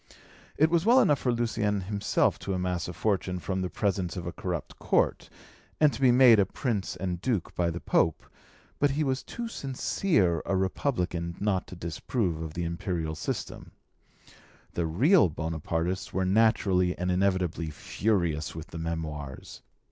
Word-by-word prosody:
It 155 +2 +4
was 170 -1 +3
well 230 - +5
for 130 -2 -1
Lucien 110 -4 0
himself 100 +2 0
to 95 - -3
amass 90 -1 -2
a 90 - -5
fortune 95 -1 -1
from 95 +1 -3
the 90 - -2
presents 95 -3 -1
of 90 - -5
a 85 - -3
corrupt 85 -5 -5
court, - - +1 0.5
and 150 -2 +5
to - - -7
be 130 -2 +6
made 120 -3 +7
a 100 - +4
Prince 110 -8 -2
and 90 -2 -3
Duke 110 -8 -1
by 85 -1 0
the 85 0 -4
Pope, 80 -2 +1 0.5
but 145 - +4
he 145 +3 0
was 130 -2 0
too 235 -1 -6
sincere 130 - 0
a 100 - +1
republican 90 -4 -1
not 100 -3 0
to - - -9
disapprove 85 - -2
of 80 -1 -6
the 85 - -2
imperial 85 -1 -2
system. 75 - -5 1.0
The 85 -1 -1
real 130 - +4
Bonapartists 80 +4 -3
were 95 0 0
naturally 95 -3 +3
and 90 +1 -1
inevitably 90 -3 0
furious 80 - -1
with 80 +1 -8
the 80 - -7
Memoirs. 75 -4 -5
95 Hz, 160 wpm, -28 LUFS, 85-110 Hz, 1.0 s, made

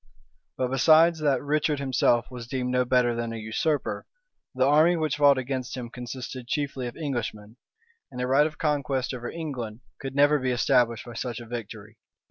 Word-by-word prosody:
But 130 -1 -1
besides 160 +4 +5
that 145 -3 +1
Richard 150 +1 +1
himself 130 -3 +1
was 120 -2 -8
deemed 125 0 -2
no 125 0 +2
better 125 -1 +3
than 115 0 -3
a - - -5
usurper, 110 +8 -2 0.5
the 130 0 +3
army 155 +5 +5
which 155 -3 -1
fought 145 -2 +5
against 130 -1 -3
him 120 -2 -6
consisted 125 0 -7
chiefly 140 -3 -2
of 120 - -8
Englishmen; 115 -7 -4 0.5
and 125 - -8
a 125 - 0
right 135 +4 +4
of 155 - -10
conquest 135 -4 -1
over 120 -1 -5
England 125 -9 -6 0.2
could 135 0 -6
never 145 +1 +4
be 130 0 -1
established 120 -1 +2
by 120 - -9
such 120 0 -4
a 120 - -9
victory. 115 -2 -8
130 Hz, 180 wpm, -26 LUFS, 120-145 Hz, 0.5 s, besides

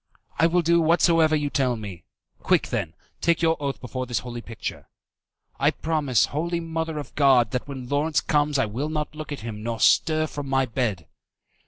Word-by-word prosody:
"I 165 - +6
will 175 +1 +2
do 170 +1 +4
whatsoever 165 -1 +4
you 145 -1 -1
tell 130 -3 +1
me." 100 -7 -8 0.3
"Quick, - - +1
then, - - -3 0.3
take 170 0 +2
your 165 0 +4
oath 140 -1 -2
before 130 0 -5
this 120 - -1
holy 120 -1 -5
picture." 115 -1 -7 0.7
"I - - +4
promise, 150 -7 +1
Holy 170 +3 -1
Mother 160 -1 -3
of 145 - -7
God, 130 -6 +4
that 125 +1 -3
when 130 -3 -7
Lawrence 145 +3 +1
comes 150 -1 +1
I 130 - +2
will 125 +8 -3
not 150 -1 -3
look 155 0 -8
at 145 - -5
him, 110 -2 -6
nor 115 0 -3
stir 155 +7 +4
from 145 -3 -6
my 135 0 +2
bed." 115 -8 -2
145 Hz, 190 wpm, -24 LUFS, 125-160 Hz, 0.7 s, I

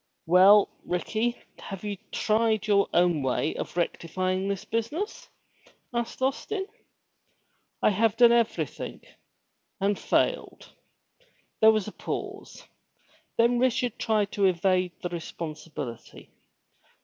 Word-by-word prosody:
'*Well, 190 +4 +7 0.2
Ricky, 220 +7 -1 0.2
have 195 0 -8
you 205 -1 -3 0.2
tried 220 0 +1
your 200 -2 +3
own 175 -3 +3
way 130 +3 0
of - - -6
rectifying 185 +2 -1
this 200 -1 -3
business?" 260 - -3 0.6
asked 235 +2 -3
Austin. 380 +9 -1 1.2
"I - - +5
have 220 +2 +1
done 240 -1 +7
everything." 235 -1 -1 0.8
"And 200 0 0
failed!" - - -1 0.9
There 220 - +7
was 215 -2 -1
a - - -5
pause, - - -6 0.7
then 235 +1 +3
Richard 255 -2 0
tried 210 -3 +1
to 200 - +1
evade 185 0 +2
the 175 - -2
responsibility. 155 -7 -7
205 Hz, 110 wpm, -27 LUFS, 180-230 Hz, 1.2 s, Well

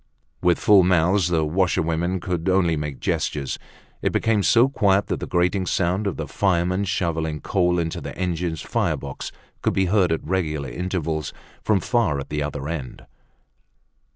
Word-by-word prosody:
With 90 -1 +3
full 105 -2 +6
mouths, 90 +1 +3
the 80 -3 +1
washerwomen 85 +1 0
could 90 0 -2
only 90 -3 +3
make 75 -2 -4
gestures. 70 -2 -2 0.4
It - - +1
became 110 -2 +2
so 120 +5 +5
quiet 100 -7 +2
that - - -1
the - - -5
grating 90 +2 +1
sound 95 +4 0
of 95 - -2
the 80 - -4
fireman 90 0 +1
shoveling 80 -4 -1
coal 90 -1 +1
into 80 -1 -2
the - - -7
engine's 85 -3 -2
firebox - - -2 0.3
could - - +1
be 95 - +3
heard 95 -6 +3
at 80 - -1
regular 75 -5 -1
intervals 80 0 -3 0.3
from 105 -4 +2
far 110 - +1
at 70 - -7
the 75 0 -2
other 75 -1 -4
end. 75 -6 -6
90 Hz, 160 wpm, -23 LUFS, 80-95 Hz, 0.4 s, full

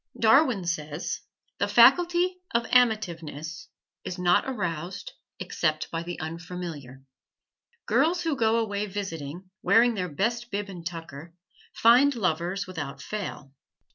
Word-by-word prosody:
Darwin 230 - +4
says, 155 -1 -3 0.4
"The - - +1
faculty 355 +1 +5 0.2
of 235 0 +2
amativeness 170 - 0 0.4
is 180 - -5
not 175 -1 +3
aroused 180 - -4 0.3
except 155 -2 -1
by 165 - -2
the 175 +1 -6
unfamiliar." 160 -5 -7 0.8
Girls 315 +10 +2
who 325 -3 0
go 225 -2 +2
away 210 -2 -1
visiting, 185 -3 -6
wearing 230 +5 +4
their 180 -4 -3
best 230 +10 -1
bib 205 -1 -3
and 175 -3 -8
tucker, 165 -1 -8 0.4
find 250 +5 +5
lovers 185 -1 -1
without 150 -7 -6
fail. 180 -10 -6
185 Hz, 120 wpm, -27 LUFS, 165-230 Hz, 0.8 s, faculty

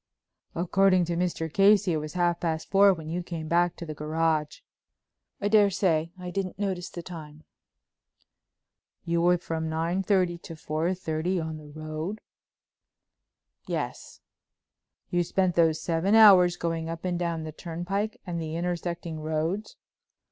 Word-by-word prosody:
"According 185 +1 +3
to 170 0 -2
Mr. 175 -2 -1
Casey 200 -2 +5
it - - +1
was 150 0 -5
half 175 -1 +1
past 160 -2 -3
four 200 0 +7
when 160 -4 -5
you 170 +3 -2
came 165 -2 -6
back 175 +2 +2
to 170 - -7
the 155 - -5
garage." 155 0 -1 0.8
"I 200 - 0
daresay; 195 -6 +3
I 180 -1 -6
didn't 185 0 -3
notice 190 -3 -2
the 175 - -8
time." 155 -3 -10 1.6
"You 170 0 +1
were 175 +1 +4
from 160 -2 -4
9:30 175 +2 0
to 165 - -9
4:30 165 +2 -2
on 160 -1 -5
the 150 -1 -12
road?" 155 +6 -5 1.5
"Yes." - - -5 0.9
"You 175 -1 +2
spent 185 +1 +1
those 165 -2 +3
seven 175 +5 +1
hours 185 -5 +7
going 165 -1 -2
up 165 +2 -6
and 175 -1 -1
down 170 -2 -2
the 155 - -6
turnpike 175 +7 -4
and 170 -3 -3
the 160 0 -4
intersecting 170 -1 -3
roads?" 160 +7 -2
170 Hz, 140 wpm, -27 LUFS, 160-185 Hz, 1.6 s, four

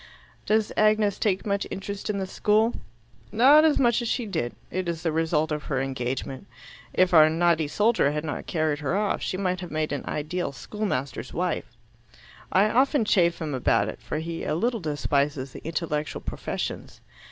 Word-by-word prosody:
"Does 215 0 +2
Agnes 215 -1 +3
take 195 -3 0
much 200 -1 -1
interest 200 +1 -5
in 210 - 0
the 190 - -2
school?" 215 +4 +2 0.6
"Not 270 +8 +7
as 315 -2 +4
much 240 -1 +3
as 235 - -3
she 240 +1 -1
did. 160 - -3 0.2
It 185 -1 -2
is 165 -1 -4
the 165 - +1
result 160 -1 0
of 150 0 -3
her 135 -2 -1
engagement. 130 0 -3 0.4
If 185 -1 +2
our 155 -2 +8
naughty 165 -1 +2
soldier 210 -2 +2
had 150 +1 -3
not 145 - -5
carried 155 -3 0
her 155 +5 -1
off, 210 -1 0
she 185 - -2
might 185 -2 -1
have 180 -2 -7
made 155 -1 -2
an 145 - -3
ideal 155 0 -3
schoolmaster's 140 - -4
wife. - - -2 0.7
I 195 +3 +4
often 265 0 +3
chaff 170 -4 +3
him 155 -3 -3
about 110 -5 +2
it, - - -8
for - - -4
he 165 +1 -4
a - - -1
little 230 +7 0
despises 145 -4 -1
the - - -10
intellectual 155 -2 -3
professions. - - -5
170 Hz, 180 wpm, -26 LUFS, 150-210 Hz, 0.7 s, our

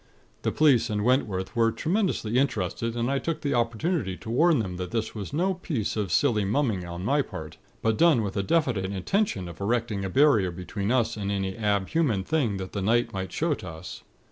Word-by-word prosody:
The - - 0
police 145 -6 +4
and 105 -1 -1
Wentworth 110 -6 0
were 115 -1 +3
tremendously 160 - 0
interested, 115 -2 -1
and 120 +2 0
I 140 - +1
took 165 +4 -3
the 145 - -1
opportunity 115 - 0
to 110 - -7
warn 160 +6 +4
them 95 -6 -3
that 90 -1 -4
this 110 +2 -2
was 105 -3 -6
no 180 +6 +1
piece 155 - -3
of 105 -5 -2
silly 110 -2 +3
mumming 105 -3 0
on 85 +2 -6
my 145 +6 +3
part; 80 - -8 0.3
but 110 -1 +1
done 165 -9 +5
with 100 - -4
a 100 - +1
definite 120 - +1
intention 100 - -1
of 85 +2 -10
erecting 110 -1 -1
a 95 - -2
barrier 125 -6 +4
between 100 +4 -4
us 120 -3 +1
and 100 -1 -2
any 95 -1 -2
ab 100 -3 0
human 135 -13 +1
thing 125 -7 0
that 95 -1 -6
the 100 - -3
night 115 +5 +1
might 95 -2 -4
show 165 0 0
to 95 -9 -7
us. 80 +2 -9
110 Hz, 210 wpm, -26 LUFS, 95-140 Hz, 0.3 s, done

